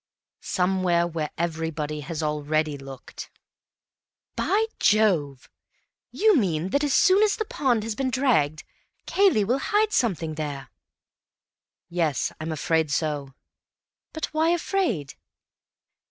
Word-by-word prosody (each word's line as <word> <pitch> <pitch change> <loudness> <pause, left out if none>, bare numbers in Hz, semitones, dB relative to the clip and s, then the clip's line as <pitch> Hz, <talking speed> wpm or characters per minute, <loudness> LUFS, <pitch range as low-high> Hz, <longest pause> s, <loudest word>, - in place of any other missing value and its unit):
"Somewhere 180 -2 +1
where 160 -3 -3
everybody 160 -2 -3
has 155 +2 -5
already 150 0 0
looked." 135 -2 -10 1.1
"By 430 +3 +1
Jove! 175 -11 +2 0.6
You 430 -1 +3
mean 180 - 0
that 280 +8 +1
as 290 - 0
soon 380 +2 +5
as 430 -1 +3
the 435 - -3
pond 245 - 0
has 225 0 -3
been 260 +4 -1
dragged, 230 - +1 0.4
Cayley 385 - +3
will 245 +7 0
hide 420 +8 +1
something 170 - 0
there?" 145 -3 -5 1.2
"Yes, 165 -5 -1
I'm 160 +1 -3
afraid 160 0 0
so." 145 -3 -2 0.8
"But 315 - -3
why 315 +1 +2
afraid?" 340 - -1
170 Hz, 115 wpm, -25 LUFS, -, 1.2 s, soon